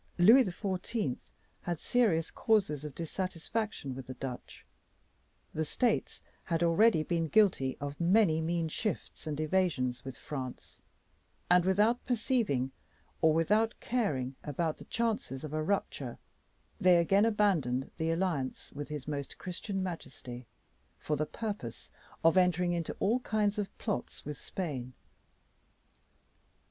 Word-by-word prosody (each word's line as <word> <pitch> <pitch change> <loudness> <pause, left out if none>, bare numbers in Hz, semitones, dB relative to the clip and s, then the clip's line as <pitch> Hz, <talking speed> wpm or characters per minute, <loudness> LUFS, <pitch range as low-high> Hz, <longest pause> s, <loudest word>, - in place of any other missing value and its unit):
Louis 225 +9 +8
XIV. 190 - -2 0.4
had 175 -3 -3
serious 200 -10 +2
causes 195 -10 +1
of 150 -3 -7
dissatisfaction 185 - -3
with 130 -1 -8
the 130 - -6
Dutch; 125 -1 -7 0.9
the 160 - 0
States 225 +8 0 0.3
had 165 -1 0
already 170 0 +5
been 165 0 0
guilty 170 -9 +3
of 145 0 -5
many 170 -3 +4
mean 165 0 0
shifts 185 0 -4
and 150 -1 -3
evasions 155 -7 +1
with 130 -1 -7
France, 130 -4 -7 0.7
and 180 0 +6
without 210 +6 +3
perceiving 220 - +1 0.5
or 160 -1 +6
without 210 +7 +2
caring 145 - -1
about 155 +2 -1
the - - -12
chances 220 - -2
of 155 -1 -6
a 155 - 0
rupture, 200 +6 -2 0.6
they 180 -3 +6
again 195 +4 +4
abandoned 185 - +2
the 160 0 0
alliance 165 -6 -1
with 145 +1 -5
his 150 -3 -6
Most 145 -2 -4
Christian 190 +1 -4
Majesty, 130 - -7 0.5
for 150 - -1
the 155 +1 -1
purpose 205 - -5 0.3
of 165 +3 +5
entering 180 -1 +3
into 170 -2 -3
all 230 +5 +2
kinds 210 -3 0
of 200 -1 -4
plots 210 - -4
with 150 -1 -5
Spain. 135 -9 -4
170 Hz, 130 wpm, -31 LUFS, 145-205 Hz, 0.9 s, Louis